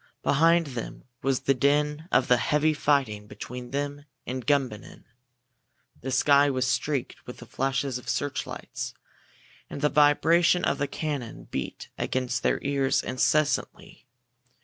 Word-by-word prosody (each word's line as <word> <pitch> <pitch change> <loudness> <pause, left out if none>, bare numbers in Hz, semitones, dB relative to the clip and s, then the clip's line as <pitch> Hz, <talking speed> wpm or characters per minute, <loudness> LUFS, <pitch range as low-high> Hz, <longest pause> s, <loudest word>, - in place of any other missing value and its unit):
Behind 165 +3 +4
them 125 -5 -7 0.2
was 135 -1 0
the 135 - +2
din 150 +3 +1
of 130 - +3
the 125 - +5
heavy 150 +5 +2
fighting 135 -9 0
between 125 +3 -8
them 145 +1 -4 0.2
and 130 0 -5
Gumbinnen. 135 -7 -1 1.0
The 130 - -5
sky 140 +2 +4
was 130 -2 0
streaked 135 0 -2
with - - -8
the - - -11
flashes 135 -1 -1
of - - -9
searchlights, 145 -1 -4 0.7
and 140 - -7
the 150 - +3
vibration 165 +4 +4
of - - 0
the 145 - 0
cannon 140 -5 -4
beat 65 - -5
against 125 -1 -1
their - - +1
ears 140 -1 +1
incessantly. 150 +4 -1
140 Hz, 135 wpm, -26 LUFS, 130-150 Hz, 1.0 s, the